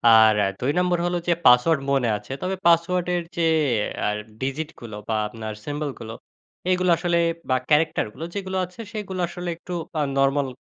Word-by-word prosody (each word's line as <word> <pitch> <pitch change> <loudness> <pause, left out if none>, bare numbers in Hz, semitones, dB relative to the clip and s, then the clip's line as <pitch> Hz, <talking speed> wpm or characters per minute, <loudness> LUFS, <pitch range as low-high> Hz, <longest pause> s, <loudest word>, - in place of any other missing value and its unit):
আর 110 -1 +7 0.2
২ 130 +3 +1
নম্বর 180 -1 +2
হলো 175 0 0
যে, 175 - +5
পাসওয়ার্ড 130 +5 +6
মনে 135 -4 +2
আছে, 105 - -12
তবে 190 +1 -1
পাসওয়ার্ডের 175 +1 +2 0.2
যে - - +1 0.6
আ - - +2 0.3
ডিজিটগুলো 135 -5 -4
বা - - +1
আপনার 110 0 -6
সিম্বলগুলো 145 -6 -4 0.6
এগুলো 185 0 +2
আসলে 175 0 +1 0.3
বা 130 - +3
ক্যারেক্টারগুলো 150 -3 +1
যেগুলো 190 -1 -3
আছে, 180 +5 -19
সেগুলো 195 -4 -5
আসলে 175 +1 -5
একটু 180 - -8 0.2
বা 155 - -2 0.2
নরমাল 135 0 +2
160 Hz, 155 wpm, -24 LUFS, 130-180 Hz, 0.6 s, আর